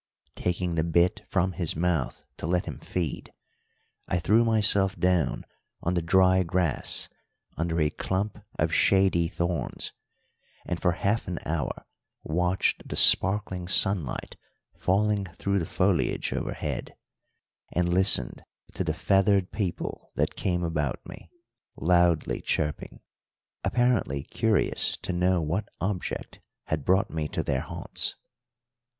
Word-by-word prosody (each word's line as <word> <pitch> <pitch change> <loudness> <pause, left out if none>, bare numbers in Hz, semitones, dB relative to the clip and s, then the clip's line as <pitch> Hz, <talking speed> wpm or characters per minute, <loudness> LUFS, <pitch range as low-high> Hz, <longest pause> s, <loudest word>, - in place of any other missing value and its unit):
Taking 90 0 -2
the 80 -1 +1
bit 85 +4 +2
from 95 0 +1
his 85 -3 +1
mouth 85 -4 -1
to - - -4
let 90 +1 +1
him - - -6
feed, 85 -6 -4 0.8
I 90 - 0
threw 105 +7 +3
myself 105 -3 +2
down 90 -7 +1 0.4
on 85 - 0
the 90 - +1
dry 95 +2 +4
grass 90 -3 -1 0.5
under 85 0 -1
a 75 -1 +2
clump 95 +5 -3
of - - 0
shady 95 -3 +3
thorns, 85 -4 -3 0.7
and 90 - -3
for 90 -2 +2
half 100 +6 -1
an 90 -2 -3
hour 80 -3 -3 0.4
watched 90 +3 0
the - - -4
sparkling 95 -2 +5
sunlight 95 -6 +1 0.4
falling 100 +1 +1
through 100 0 0
the 80 - -3
foliage 90 -1 0
overhead, - - -4 0.8
and 90 +1 +1
listened 95 +3 +3 0.3
to - - -2
the - - -2
feathered 95 -1 +2
people 95 -6 -4
that - - 0
came 90 -2 -1
about 75 -5 -1
me, - - -11 0.5
loudly 85 -2 +2
chirping, 75 -2 -2 0.6
apparently 120 - +1
curious 110 +5 +1
to 90 - -4
know 90 -1 +2
what 90 +7 -2
object 95 -1 -4 0.2
had 75 -3 -3
brought 95 +2 +2
me 80 -2 -2
to - - -3
their 65 -2 -1
haunts. - - -4
90 Hz, 130 wpm, -27 LUFS, 85-95 Hz, 0.8 s, sparkling